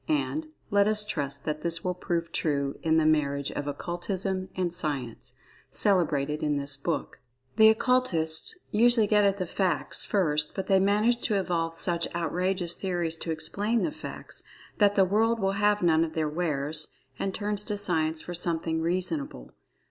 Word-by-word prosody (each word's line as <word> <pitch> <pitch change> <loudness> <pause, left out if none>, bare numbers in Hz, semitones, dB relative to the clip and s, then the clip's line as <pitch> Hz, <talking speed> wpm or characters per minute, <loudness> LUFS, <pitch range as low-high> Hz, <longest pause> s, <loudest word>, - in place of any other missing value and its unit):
And, 310 0 -1 0.2
let 200 0 +4
us 210 -1 +4
trust 140 -8 -3
that 155 0 -3
this 170 0 +4
will 180 - -1
prove 170 -2 -3
true 140 -4 -1
in 160 -1 +2
this 160 - +3
marriage 140 -3 +1
of 145 - -5
Occultism 185 +5 -3
and 180 -2 -1
Science, 140 -9 -4 0.4
celebrated 155 -6 +1
in 150 -2 0
this 140 0 +2
book. 135 - -4 0.4
The 220 0 +8
Occultists 220 - +1
usually 230 +1 +4
get 210 0 +3
at 200 0 +2
the 185 - -2
"facts," 170 -5 0
first, 150 -7 +1
but 190 - -3
they 195 0 +3
manage 210 +5 +2
to 210 -3 +1
evolve 165 -3 -2
such 170 0 +2
outrageous 180 +1 0
theories 175 -4 -2
to 165 - -6
explain 200 +9 0
the 315 - -1
facts, 300 - -7 0.4
that 205 -1 +4
the 195 - +5
world 225 +4 +1
will 195 -1 +1
have 210 -1 +2
none 165 -1 +4
of 160 -1 -4
their 160 -1 -1
wares, 150 -1 -1 0.3
and 195 - -1
turns 205 +1 -2
to 210 - -2
Science 160 -5 0
for 175 - -7
something 165 -2 -1
"reasonable." 165 - -3
175 Hz, 170 wpm, -27 LUFS, 155-200 Hz, 0.4 s, The